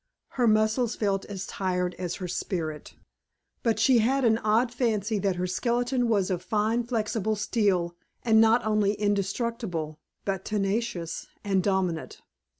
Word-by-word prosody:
Her 245 -2 +1
muscles 215 +2 +2
felt 195 -2 0
as 195 -2 -6
tired 180 -2 -1
as 180 -2 -3
her 185 - -5
spirit, 165 -4 -4 0.7
but 225 -3 +1
she 245 +2 +5
had 260 +4 +2
an 225 -1 +4
odd 230 +3 +2
fancy 220 -4 0
that 195 -1 0
her 180 +1 -1
skeleton 245 +6 0
was 200 -4 +2
of 180 -1 -1
fine 215 +5 0
flexible 220 -2 -1
steel 200 -5 0 0.3
and 220 -2 +5
not 225 +1 +4
only 210 -2 +2
indestructible 200 -5 -2 0.3
but 195 -1 -2
tenacious 200 -4 -2 0.2
and 195 -2 +1
dominant. 185 -4 -1
210 Hz, 145 wpm, -27 LUFS, 185-230 Hz, 0.7 s, she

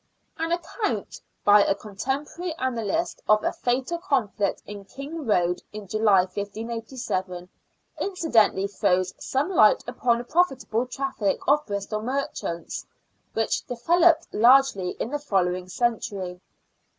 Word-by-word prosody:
An 325 0 -3
account 345 +5 -3 0.2
by 205 0 +7
a 195 - +1
contemporary 275 - -4
annalist 260 - -1
of 215 0 +5
a - - 0
fatal 260 +7 -1
conflict 220 - -1
at 200 -1 -9
Kingroad 265 - -1
in 210 -1 -8
July, 210 -1 +4
1587, 205 -1 -4 0.5
incidentally 270 - +2
throws 185 -2 +1
some 275 +6 0
light 215 - +5
upon 235 -1 +1
a - - -5
profitable 260 -6 0
traffic 245 -5 -1
of 295 +2 +4
Bristol 200 +1 -3
merchants, 245 -9 -3 0.5
which 225 0 0
developed 330 +7 +3
largely 235 -5 +4
in 235 - -3
the 295 - -1
following 185 -8 0
century. 195 -5 -2
230 Hz, 115 wpm, -25 LUFS, 200-275 Hz, 0.5 s, by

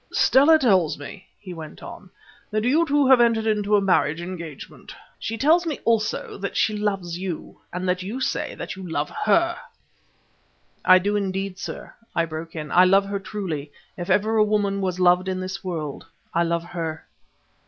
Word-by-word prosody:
"Stella 290 +5 +5
tells 190 - +2
me," 145 +7 -10
he 185 -3 -9
went 160 -2 -10
on, 185 - -10 0.4
"that 215 0 -1
you 305 +8 +3
two 290 0 +3
have 260 -2 +6
entered 230 -2 +3
into 210 -1 +2
a 205 - +4
marriage 175 -5 +2
engagement. 170 -4 -8 0.2
She 225 - -4
tells 320 +8 +4
me 305 - -2
also 220 -3 0
that 200 0 -4
she 215 - +2
loves 195 -5 -2
you, 180 -4 -6
and 180 +1 -4
that 180 0 0
you 210 +8 -5
say - - -2
that - - -6
you 190 - -9
love 150 -2 -2
her." 340 +10 +2 1.3
"I 185 - +7
do 200 +3 0
indeed, 195 -1 -2
sir," - - -7 0.2
I 170 - +2
broke 165 +1 -7
in; 150 -2 -6
"I 180 - +6
love 195 +2 +4
her 200 0 -3
truly; 170 -8 -5 0.2
if 175 0 -6
ever 215 +4 +2
a 215 - +6
woman 205 -2 0
was 185 -1 -2
loved 180 +1 +4
in 185 -1 -2
this 185 +1 -5
world, 160 -5 -5 0.3
I 170 0 +2
love 170 0 -1
her." 165 -2 -5
190 Hz, 185 wpm, -23 LUFS, 175-215 Hz, 1.3 s, I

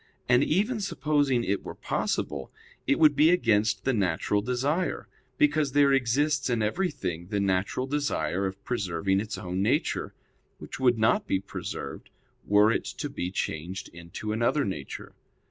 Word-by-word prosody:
And 125 +2 +5
even 210 - +1
supposing 145 -9 +1
it 100 -2 -1
were - - -8
possible, 70 -2 -2 0.4
it - - +3
would 155 -2 +5
be 150 +3 +5
against 110 - +2
the 135 - +1
natural 100 0 +1
desire; 135 - -1 0.3
because 155 - +2
there 140 -1 +5
exists 135 +2 +1
in 115 -3 +1
everything 100 - -2
the 100 +1 -1
natural 95 +5 0
desire 100 - -1
of 95 +1 -8
preserving 95 -4 0
its 105 +1 -4
own 90 +1 -3
nature; 130 - 0 0.4
which - - -9
would 125 -3 +3
not 110 0 +2
be 95 - +1
preserved 80 -7 -7 0.3
were 105 +2 +4
it - - -1
to - - -5
be 90 - -3
changed 95 +1 -4
into 85 +5 -7
another 120 +6 +1
nature. 75 -9 -6
110 Hz, 150 wpm, -27 LUFS, 95-140 Hz, 0.4 s, And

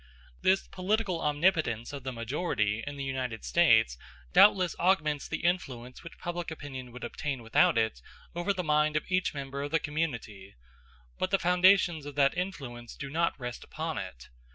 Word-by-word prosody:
This 190 +1 +3
political 190 -2 -1
omnipotence 150 - +1
of 140 - -5
the 130 - -3
majority 115 - -1
in 145 0 -5
the 140 - -4
United 130 -4 -3
States 110 - +4 0.3
doubtless 185 -4 +6
augments 155 -6 +2
the - - -4
influence 130 -9 -2
which 170 - -11
public 175 -1 -4
opinion 135 -5 -7
would 125 +1 -10
obtain 130 +1 -4
without 115 +1 +3
it 110 - 0 0.3
over 175 +3 0
the 185 -2 -2
mind 150 -1 +2
of 155 - 0
each 185 -4 +1
member 140 0 -5
of 145 - -3
the 165 +2 +2
community; 120 -11 -4 0.6
but 185 - 0
the 195 - +3
foundations 180 -3 +4
of 145 - -8
that 140 +1 +3
influence 135 -11 -5
do 140 -1 -7
not 165 0 0
rest 120 -1 -6
upon - - -4
it. - - -8
145 Hz, 170 wpm, -29 LUFS, 125-175 Hz, 0.6 s, doubtless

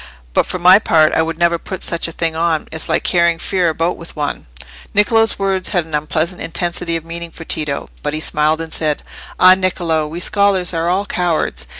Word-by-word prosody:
But, - - +2
for - - -3
my 180 +3 +7
part, 160 -7 +3
I - - +3
would 160 0 -3
never 170 0 +2
put 190 +1 -7
such 170 -1 0
a - - -6
thing 165 -1 -2
on. 165 -1 0
It's 160 - -3
like - - +1
carrying 170 -2 +2
fear 180 0 0
about 165 +3 -1
with 170 - -7
one." 145 -2 -4 0.5
Niccolò's 225 +2 +3
words 195 -1 0
had 175 -5 0
an 160 - -14
unpleasant 155 +4 -1
intensity 170 0 -1
of 165 -1 -4
meaning 170 0 -6
for 165 0 -11
Tito. 150 -3 -2
But 150 0 -2
he - - -1
smiled 155 +1 0
and 160 0 -6
said— 155 -2 0 0.4
"Ah, 185 0 +8
Niccolò, 175 -5 0
we 165 +3 -6
scholars 195 -1 +1
are 165 +1 -1
all 190 +3 0
cowards. 175 -5 -1
170 Hz, 210 wpm, -17 LUFS, 160-180 Hz, 0.5 s, Ah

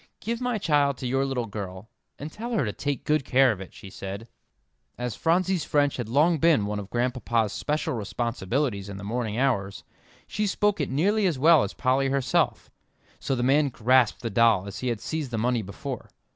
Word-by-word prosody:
"Give 230 +3 -3
my 245 -2 0
child 145 -7 +2
to - - -6
your 135 +2 +1
little 125 -3 -2
girl, 100 -2 -7 0.3
and 150 +2 -7
tell 235 +6 -6
her 210 - +1
to 105 - -3
take 145 -2 -3
good 150 -1 +2
care 130 0 +4
of 100 -3 -5
it," 95 - -9
she 95 - -12
said. 100 +4 -7 0.7
As 120 -3 -3
Phronsie's 180 +1 +1
French 145 -1 +1
had 120 -4 -4
long 155 +6 +3
been 160 -10 +4
one 105 0 -3
of 100 -1 -8
Grandpapa's 120 -3 0
special 150 +1 -2
responsibilities 115 0 -2
in 100 - -7
the 100 - -8
morning 110 0 -2
hours, 100 -7 0 0.4
she 210 0 -2
spoke 205 +1 +1
it - - -2
nearly 195 +9 +2
as 165 -6 -1
well 155 +2 +6
as 100 - -3
Polly 135 +1 +1
herself, 135 -2 0 0.5
so 135 - -1
the 120 - -1
man 140 +3 +3
grasped 125 -1 +2
the 115 - -2
doll 115 -5 +4
as 100 0 -7
he 130 - -3
had 120 -3 -1
seized 155 -4 -3
the 115 - -3
money 120 +1 +1
before. 125 +6 -7
130 Hz, 200 wpm, -26 LUFS, 110-150 Hz, 0.7 s, well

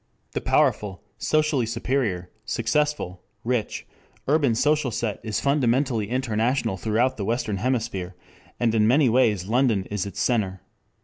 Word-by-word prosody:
The - - -3
powerful, 100 -3 +1 0.2
socially 155 -6 +1
superior, 115 -6 -1
successful, 115 -4 -1 0.2
rich, 120 -2 -2 0.4
urban 140 -5 +3
social 150 +2 +2
set 115 -2 -2
is 110 -2 -2
fundamentally 130 -5 +1
international 120 -2 0
throughout 115 +7 0
the 105 - -3
western 110 -2 -1
hemisphere, 110 -6 -2 0.4
and 115 -2 +2
in 110 -1 +3
many 135 +2 +4
ways 110 -6 +2
London 115 -3 +2
is 100 -1 -2
its 100 - -7
center. 95 -7 0
115 Hz, 130 wpm, -24 LUFS, 105-130 Hz, 0.4 s, many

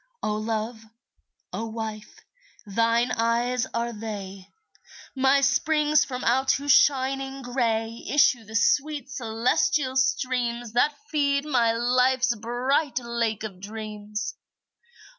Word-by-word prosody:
O 210 - 0
Love, 220 +1 -3 0.7
O 225 - -3
Wife, 220 -1 -7 0.4
thine 230 +4 +1
eyes 235 +2 0
are 235 0 -2
they, 200 -3 -7 0.7
My 270 +1 +3
springs 300 +2 +3
from 255 -1 -6
out 265 +3 +3
whose 285 +1 0
shining 270 0 +2
gray 230 -2 -1
Issue 255 -4 +4
the 220 +1 -10
sweet 285 +4 +1
celestial 255 +3 0
streams 240 -2 0
That 285 +5 +2 0.2
feed 280 -2 +1
my 240 -6 +2
life's 250 +1 +2
bright 245 +6 -1
Lake 235 -3 -2
of 195 -4 -7
Dreams. 210 +1 -6
240 Hz, 110 wpm, -25 LUFS, 225-265 Hz, 0.7 s, Issue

